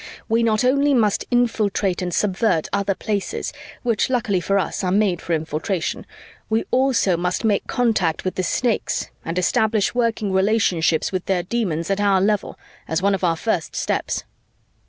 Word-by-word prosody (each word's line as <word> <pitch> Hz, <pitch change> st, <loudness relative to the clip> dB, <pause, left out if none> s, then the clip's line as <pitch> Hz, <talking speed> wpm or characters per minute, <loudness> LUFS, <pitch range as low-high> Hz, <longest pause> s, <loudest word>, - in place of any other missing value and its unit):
We 230 Hz, +1 st, +2 dB
not 220 Hz, 0 st, +2 dB
only 280 Hz, +2 st, +3 dB
must 215 Hz, -4 st, +2 dB
infiltrate 215 Hz, -6 st, +1 dB
and 180 Hz, -1 st, -2 dB
subvert 195 Hz, -3 st, +1 dB
other 200 Hz, -1 st, 0 dB
Places, 205 Hz, -1 st, -3 dB, 0.3 s
which 235 Hz, 0 st, +1 dB
luckily 220 Hz, -7 st, 0 dB
for 195 Hz, +3 st, +1 dB
us 195 Hz, -, -2 dB
are 180 Hz, -, 0 dB
made 195 Hz, -3 st, +2 dB
for 170 Hz, -, -2 dB
infiltration, 160 Hz, +3 st, -2 dB, 0.4 s
we 220 Hz, +1 st, +1 dB
also 255 Hz, -8 st, +3 dB
must 180 Hz, +4 st, -1 dB
make 205 Hz, -3 st, +1 dB
contact 215 Hz, -11 st, 0 dB
with 185 Hz, -, -1 dB
the -, -, -2 dB
Snakes 225 Hz, +6 st, -1 dB
and 165 Hz, +2 st, -4 dB
establish 210 Hz, +3 st, +1 dB
working 230 Hz, -4 st, 0 dB
relationships 190 Hz, -5 st, +2 dB
with 185 Hz, -2 st, -3 dB
their 185 Hz, -2 st, +1 dB
Demons 180 Hz, -5 st, -2 dB
at 195 Hz, +1 st, 0 dB
our 200 Hz, -2 st, +3 dB
level 205 Hz, +1 st, 0 dB, 0.3 s
as 160 Hz, +3 st, -1 dB
one 200 Hz, 0 st, +3 dB
of 195 Hz, -, -2 dB
our 170 Hz, -2 st, +2 dB
first 185 Hz, -4 st, -2 dB
steps." -, -, -1 dB
200 Hz, 165 wpm, -21 LUFS, 180-225 Hz, 0.4 s, only